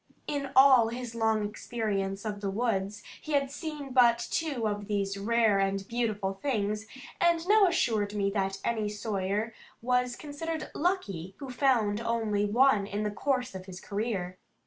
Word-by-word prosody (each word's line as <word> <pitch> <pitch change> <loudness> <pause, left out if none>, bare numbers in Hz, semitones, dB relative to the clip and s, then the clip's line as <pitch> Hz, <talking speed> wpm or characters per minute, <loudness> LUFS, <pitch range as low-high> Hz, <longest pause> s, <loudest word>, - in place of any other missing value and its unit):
In 280 -2 -3
all 260 -3 +7
his 240 0 -5
long 220 -2 +1
experience 205 -2 -3
of 205 -1 -4
the 200 - -1
woods, 205 -2 -1 0.2
he 310 - -5
had 275 -1 +1
seen 290 -2 -6
but 240 -2 +6
two 280 -9 -1
of 205 -1 -3
these 200 -2 -1
rare 220 0 +2
and 195 0 0
beautiful 215 -5 -1
things, 210 -2 -2 0.3
and 340 0 +3
now 420 -1 +6
assured 220 - +1
me 200 -1 +1
that 195 -1 -1
any 220 -3 0
sawyer 210 +1 -2 0.3
was 250 0 +1
considered 315 +2 -5
lucky 195 - -2
who 270 -2 -7
found 235 -5 +2
only 225 -3 0
one 215 -1 +3
in 205 +1 -3
the 210 - -1
course 255 +4 -1
of 190 0 -8
his 185 -1 -8
career. 200 -4 -3
220 Hz, 160 wpm, -29 LUFS, 200-260 Hz, 0.3 s, all